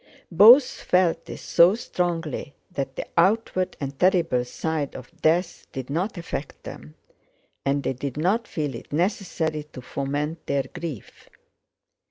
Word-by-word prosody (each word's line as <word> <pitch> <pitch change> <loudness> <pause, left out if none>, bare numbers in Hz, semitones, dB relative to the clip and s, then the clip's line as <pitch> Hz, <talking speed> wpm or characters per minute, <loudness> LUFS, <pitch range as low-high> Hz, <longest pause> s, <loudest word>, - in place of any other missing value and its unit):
Both 230 - +9
felt 175 -2 +2
this - - -9
so 175 +4 +5
strongly 165 - -3 0.2
that 140 -1 -4
the - - -4
outward 185 +1 +2
and 140 -1 -5
terrible 170 -9 +3
side 150 +2 -3
of 130 -2 -9
death 170 +3 +1
did 130 0 -6
not 180 +7 -2
affect 165 -4 -6
them 75 +2 -10 0.7
and 140 0 0
they - - 0
did 135 +2 -5
not 200 +9 +1
feel 150 -4 -3
it 115 - -10
necessary 165 -2 -1
to 130 - -8
foment 145 +5 -3
their 140 -1 +1
grief. 165 - -8
160 Hz, 140 wpm, -24 LUFS, 140-180 Hz, 0.7 s, Both